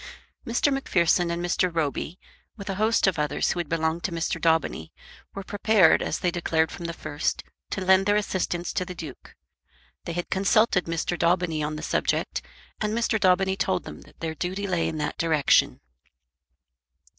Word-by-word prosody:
Mr. 240 +4 +2
Macpherson 180 -9 +2
and 170 +1 -2
Mr. 180 +1 +1
Roby, 165 +1 -2 0.4
with 200 -1 -9
a 195 +2 -4
host 225 +1 +3
of 185 -5 +1
others 150 0 0
who - - -3
had 170 -4 -3
belonged 160 +1 -1
to 195 - -1
Mr. 165 0 -2
Daubeny, 160 - +1 0.4
were 195 - -5
prepared, 205 -3 +4
as - - -1
they 180 - 0
declared 165 -2 0
from 170 - -7
the 170 - -3
first, 145 -2 -3 0.3
to 190 - -3
lend 190 +1 +5
their 205 - +4
assistance 180 -4 -1
to - - 0
the 180 0 -8
Duke. 155 -6 -10 0.7
They 170 - -4
had 175 +1 -4
consulted 195 0 +3
Mr. 165 +1 -2
Daubeny 170 -2 +1
on 150 +1 -2
the 150 - -7
subject, - - -1 0.4
and 215 +1 -1
Mr. 230 -1 +1
Daubeny 190 0 +3
told 185 -2 0
them - - -9
that - - -19
their 160 -1 -2
duty 185 +5 -3
lay 180 -4 0
in 160 - -3
that 150 - -3
direction. 160 -3 +3
175 Hz, 180 wpm, -25 LUFS, 165-195 Hz, 0.7 s, lend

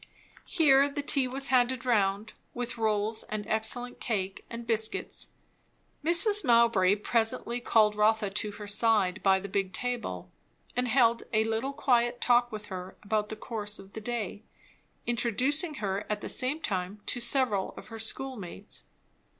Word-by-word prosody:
Here 280 -4 +4
the 285 0 -4
tea 275 -2 +2
was 270 +2 -1
handed 255 0 +2
round, 210 -3 +1 0.2
with 245 -1 -5
rolls 215 0 0
and 210 -1 -4
excellent 230 +3 -1
cake 195 -4 -3
and 235 0 -7
biscuits. 220 -1 0 0.8
Mrs. 350 +6 +5
Mowbray 230 -7 +4
presently 230 +2 0
called 215 -3 +3
Rotha 210 -1 +2
to 210 +1 -2
her 210 0 -9
side, 205 -2 +2
by 190 -1 +4
the 200 - -7
big 195 -1 -2
table; 245 +1 -3 0.4
and 250 0 0
held 235 -1 +3
a 215 0 +3
little 225 +5 -2
quiet 245 -3 +1
talk 240 0 +3
with 210 -1 -7
her 185 -1 -8
about 210 0 -1
the 220 - -5
course 215 -1 -5
of 195 0 -14
the 220 - -7
day, 215 -3 -4 0.6
introducing 260 - 0
her 200 -4 -3
at 210 -1 -2
the - - -5
same 265 +5 +1
time 190 -1 -3
to 245 - -1
several 235 -5 +1
of - - -11
her 225 -1 -8
schoolmates. 220 -5 -4
225 Hz, 155 wpm, -29 LUFS, 210-245 Hz, 0.8 s, Mrs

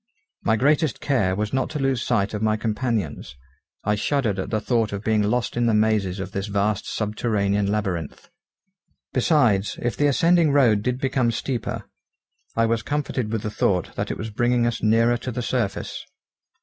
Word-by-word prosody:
My 110 - +2
greatest 145 +4 +2
care 110 -10 +1
was 105 +3 -2
not 130 - 0
to 155 - -4
lose 135 -3 +1
sight 110 -5 0
of 105 - -3
my 110 0 +2
companions. 110 - -2 0.5
I 105 - +1
shuddered 105 -2 0
at 95 - -3
the 110 - 0
thought 115 -2 0
of 100 0 -5
being 110 -1 +2
lost 115 +4 0
in 120 0 +1
the 110 - +3
mazes 105 -3 +1
of 95 0 -5
this 100 +1 -3
vast 105 0 -1
subterranean 105 -2 0
labyrinth. 95 - -3 0.8
Besides, 110 - +2
if 120 - -2
the 145 - +2
ascending 165 +2 +4
road 120 -8 +4
did 125 +3 -1
become 135 -3 +1
steeper, 115 +1 -3 0.7
I 115 - +3
was 115 0 +1
comforted 135 -6 -2
with 110 -1 -2
the 110 - -3
thought 90 -4 0
that - - -3
it - - -3
was 110 +1 -5
bringing 120 +2 +2
us 120 -1 -1
nearer 115 +2 +3
to 125 +2 -5
the 120 +1 -3
surface. 110 -5 -2
110 Hz, 180 wpm, -23 LUFS, 105-125 Hz, 0.8 s, ascending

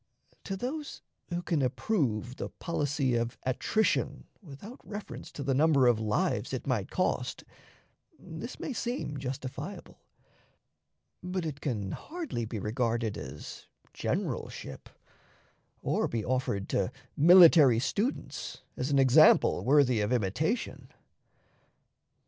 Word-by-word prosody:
To 195 - -3
those 285 +7 -5 0.3
who 175 0 -3
can 165 -5 0
approve 130 - -1
the - - -4
policy 145 -5 -1
of 120 0 -1
attrition 170 - 0 0.2
without 195 - -11
reference 205 -1 -8
to 140 - -5
the 135 0 +1
number 145 -1 +4
of 120 -3 +4
lives 105 -1 0
it - - -3
might - - -1
cost, - - -1 0.7
this 160 +10 -8
may 275 - -4
seem 235 - -3
justifiable, 130 0 -6 1.2
but 180 -1 -3
it 145 -3 -5
can 105 -9 -2
hardly 315 - -5
be 110 0 -5
regarded 115 0 -1
as 65 -9 -8 0.3
generalship, - - -4 0.9
or - - +1
be 115 -2 -3
offered 125 -6 -1
to 100 +4 0 0.2
military 165 -6 +8
students 205 - -3
as 125 - -2
an 140 - +2
example 135 +3 +6
worthy 130 -4 +4
of 105 +3 -1
imitation. 125 - -1
135 Hz, 115 wpm, -30 LUFS, 120-175 Hz, 1.2 s, military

